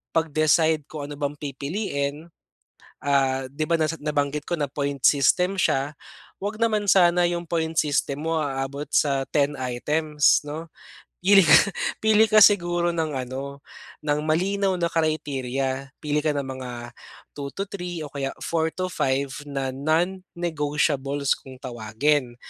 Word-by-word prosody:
pag-decide 155 0 +2
kung 145 -2 -6
ano 145 - -6
bang 145 0 -2
pipiliin. 140 0 -3 0.9
Ah, 135 -2 +1
'di 155 +3 -2
ba, 170 - +4
nasa 160 +1 0
nabanggit 145 -1 -1
ko 175 - 0
na 145 -2 -1
point 140 -1 -2
system 180 +8 +4
siya, 140 -4 +1 0.5
wag 205 +2 -3
naman 215 -2 +2
sana 175 -2 +5
yung 175 0 -2
point 165 -1 -1
system 145 -1 0
mo 165 -1 +1
aabot 140 0 -3
sa 135 -2 +2
10 145 0 +1
items 150 +4 +2
'no. 160 +3 -6 0.6
Pili 195 +1 +7
ka - - +9 0.4
pili 220 0 +5
ka 215 - +6
siguro 175 -4 +3
ng 160 -2 -1
ano 135 +2 -5 0.5
ng 145 0 +1
malinaw 190 +4 +1
na 170 - +1
criteria. 135 -4 -1
Pili 150 -1 0
ka 155 - +2
ng 140 -1 -2
mga 130 -1 -6 0.7
2 140 -1 -5
or 195 +7 -4
3 180 -3 -6
o 145 - -8
kaya 135 -1 -2
4 160 -1 0
to 185 - -2
5 135 -1 0 0.2
na 135 -2 -3
non-negotiables 150 -3 0
kung 130 -1 -12
tawagin. 120 +2 -1
150 Hz, 145 wpm, -24 LUFS, 140-170 Hz, 0.9 s, ka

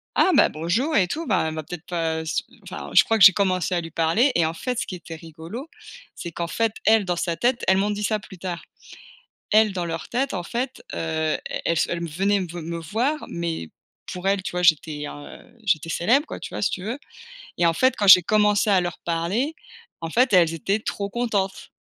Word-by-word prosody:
«Ah 375 - +4
bah, - - +6
bonjour» 175 - -1
et 185 - +3
tout. 320 - -4
Bah, 190 - +1
elle 160 - -3
va 155 - -4
peut-être 175 +2 -8
pas 165 -2 -2
s 160 0 -2 0.2
enfin - - -8
je - - +8
crois 225 - +2
que 200 - +5
j'ai 190 - +11
commencé 185 -2 0
à 175 - +1
lui 165 -1 -7
parler 170 - +2
et 170 - +3
en 160 - -1
fait 250 +8 -4
ce - - -1
qui 185 - -6
était 170 -2 -9
rigolo, 165 - -9 0.5
c'est 170 - -7
qu'en 170 +1 -3
fait, 225 +3 0
elle 220 -2 +5
dans 180 -1 -1
sa 170 -1 -2
tête 240 0 +1
elles 190 - +4
m'ont 205 +2 +1
dit 210 0 -3
ça 215 +1 0
plus 195 -2 -13
tard. 175 -1 -5 0.9
Elles 215 -1 +5
dans 175 -2 -3
leur 165 -1 -5
tête 255 -3 -1
en 180 - -2
fait, 245 +8 -4
heu, 160 -1 -1 0.3
elles 170 - +1
se - - +1
elles 170 - -1
m 170 - -4
venaient 195 +6 +1
me 185 - -3
ve 175 +1 -8
me 170 +1 -5
voir, 235 - -1
mais 165 - -4 0.4
pour 180 +1 -3
elles 195 -1 +1
tu - - -4
vois? 180 0 -2
J'étais 155 -3 +2
un, 145 0 -10
heu, 240 - -22
j'étais 165 -5 +1
célèbre 245 - +2
quoi, - - -7
tu - - -8
vois? - - -4
Si 210 - +2
tu 180 - -4
veux 235 +6 -3 0.6
et 170 - +2
en 165 - +4
fait 260 +9 +2
quand 205 - 0
j'ai 185 -2 +10
commencé 210 +2 +2
à 190 -2 +5
leur 175 -1 -4
parler, 180 - -1 0.5
en 165 -1 -5
fait 250 +4 +3
elles 170 -3 +5
étaient 195 +6 -1
trop 200 -2 -4
contentes. 205 -5 -2
180 Hz, 240 wpm, -23 LUFS, 165-215 Hz, 0.9 s, j'ai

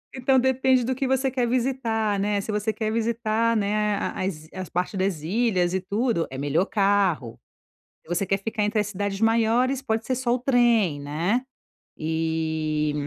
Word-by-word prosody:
Então 260 +1 +2
depende 260 0 +3
do 255 +3 0
que 265 +1 -1
você 265 0 +1
quer 250 -2 0
visitar, 230 -4 0
né? 205 0 0
Se 215 - -5
você 210 +1 -1
quer 215 +1 -2
visitar, 230 0 0
né, 210 0 +1
a - - -3
as 160 -5 -4
i - - -19
as 185 -2 -6
partes 180 +3 -2
das 190 -4 -1
ilhas 185 0 +1
e 190 - +1
tudo, 200 0 -1
é 130 - -7
melhor 145 +6 +1
carro. 195 - +1 0.6
Se - - -26
você 180 - 0
quer 195 +1 0
ficar 220 +2 -3
entre 210 +1 0
as 210 - +1
cidades 200 -1 -3
maiores, 230 +4 +2
pode 225 -3 -2
ser 260 - 0
só 245 -1 0
o - - 0
trem, 235 - +2
né? 165 - -1 0.6
E, 160 -1 -1
210 Hz, 185 wpm, -25 LUFS, 180-240 Hz, 0.6 s, depende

